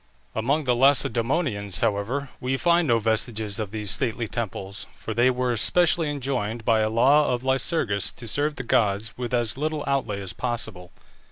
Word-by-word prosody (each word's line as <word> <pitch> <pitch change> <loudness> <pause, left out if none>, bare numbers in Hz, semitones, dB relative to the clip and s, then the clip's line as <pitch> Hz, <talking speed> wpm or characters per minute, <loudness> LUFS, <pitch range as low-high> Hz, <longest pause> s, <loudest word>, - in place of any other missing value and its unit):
Among 140 +8 0
the 125 -3 +2
Lacedæmonians, 120 - +1
however, 115 +6 -1
we 130 +1 -1
find 170 +2 +3
no 120 -2 +4
vestiges 110 -1 -1
of 105 -2 -3
these 105 -1 -2
stately 120 -3 -1
temples, 100 -3 -5
for 110 - -6
they 120 +3 +4
were 125 -1 0
specially 170 +4 +3
enjoined 125 -6 -3
by 115 -2 +3
a 110 0 +1
law 135 +7 +4
of 125 0 -2
Lycurgus 130 - +1
to 120 - -7
serve 145 +6 0
the - - -5
gods 105 -2 +1
with 125 -2 -5
as 120 0 -1
little 155 0 -2
outlay 130 -7 -1
as 95 -3 -6
possible. 110 -5 -4
120 Hz, 170 wpm, -25 LUFS, 110-135 Hz, -, no